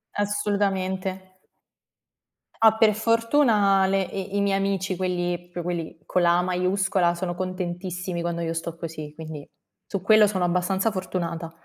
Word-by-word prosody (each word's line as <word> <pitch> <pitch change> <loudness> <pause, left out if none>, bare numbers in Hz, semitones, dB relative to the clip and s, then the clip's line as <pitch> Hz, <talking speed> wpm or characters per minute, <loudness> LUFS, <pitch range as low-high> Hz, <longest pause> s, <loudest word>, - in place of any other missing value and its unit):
Assolutamente. 195 -2 -1 1.3
Ah, 220 -1 +6
per 220 -1 +5
fortuna 225 -3 +3
le 195 0 +2
i 195 +1 -4
i - - +2
miei 200 -1 +2
amici, 195 -1 -1
quelli, 175 -1 -2
più 175 0 -5
quelli 170 -2 -4
con 180 - +1
la 175 0 +4
A - - +3
maiuscola, 185 0 +1
sono 175 0 -3
contentissimi 180 -1 -4
quando 170 0 -2
io 165 0 -2
sto 165 0 -5
così, 155 -3 -6
quindi 155 -2 -8 0.4
su 195 - -4
quello 215 +2 +6
sono 190 -3 0
abbastanza 180 +4 +1
fortunata. 170 -4 -4
185 Hz, 145 wpm, -25 LUFS, 175-200 Hz, 1.3 s, Ah